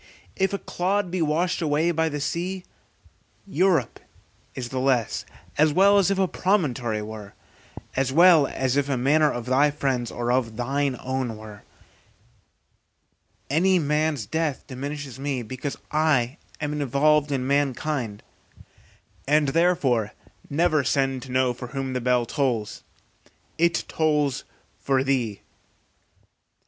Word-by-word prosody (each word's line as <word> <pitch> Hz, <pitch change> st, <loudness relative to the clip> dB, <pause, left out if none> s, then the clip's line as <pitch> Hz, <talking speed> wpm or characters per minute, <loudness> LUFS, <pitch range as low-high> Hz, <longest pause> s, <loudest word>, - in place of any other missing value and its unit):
If 190 Hz, 0 st, +1 dB
a 200 Hz, -, -1 dB
clod 190 Hz, 0 st, -1 dB
be 185 Hz, -1 st, -1 dB
washed 165 Hz, +4 st, 0 dB
away 155 Hz, +2 st, +1 dB
by 160 Hz, -1 st, +1 dB
the 150 Hz, -1 st, -4 dB
sea, 180 Hz, +5 st, -3 dB, 0.8 s
Europe 180 Hz, -, +1 dB, 0.6 s
is 125 Hz, -2 st, -5 dB
the 130 Hz, -, -3 dB
less, 130 Hz, -4 st, 0 dB, 0.3 s
as 155 Hz, 0 st, +4 dB
well 200 Hz, +4 st, +5 dB
as 195 Hz, -, +3 dB
if 195 Hz, -, 0 dB
a 190 Hz, -1 st, +2 dB
promontory 130 Hz, -, 0 dB
were, 105 Hz, -2 st, -9 dB, 0.6 s
as 135 Hz, -1 st, +1 dB
well 165 Hz, -1 st, +6 dB
as 130 Hz, -1 st, -1 dB
if 145 Hz, 0 st, +1 dB
a 135 Hz, -, 0 dB
manor 150 Hz, +4 st, +3 dB
of 120 Hz, -1 st, -5 dB
thy 135 Hz, +4 st, +3 dB
friend's 135 Hz, -5 st, -1 dB
or 120 Hz, 0 st, -2 dB
of 120 Hz, -3 st, 0 dB
thine 135 Hz, +2 st, -1 dB
own 130 Hz, -3 st, -3 dB
were: 105 Hz, -1 st, -11 dB, 1.9 s
any 180 Hz, +6 st, +3 dB
man's 150 Hz, -5 st, 0 dB
death 155 Hz, +4 st, -2 dB
diminishes 140 Hz, 0 st, -6 dB
me, 135 Hz, -3 st, -2 dB
because 130 Hz, +5 st, -5 dB
I 150 Hz, -4 st, +1 dB, 0.2 s
am 150 Hz, 0 st, -2 dB
involved 145 Hz, +2 st, +2 dB
in 130 Hz, -2 st, -1 dB
mankind, 140 Hz, -5 st, -1 dB, 1.0 s
and 150 Hz, 0 st, +3 dB
therefore 135 Hz, -, +2 dB, 0.4 s
never 155 Hz, -1 st, +2 dB
send 135 Hz, 0 st, 0 dB
to 130 Hz, 0 st, -9 dB
know 130 Hz, -1 st, +2 dB
for 125 Hz, +1 st, -8 dB
whom 135 Hz, -1 st, -2 dB
the 125 Hz, -, -2 dB
bell 125 Hz, 0 st, +2 dB
tolls; 120 Hz, -5 st, -2 dB, 0.8 s
it 170 Hz, 0 st, +2 dB
tolls 150 Hz, -4 st, 0 dB, 0.3 s
for 135 Hz, -1 st, +1 dB
thee. 125 Hz, -7 st, -1 dB
140 Hz, 135 wpm, -24 LUFS, 125-155 Hz, 1.9 s, well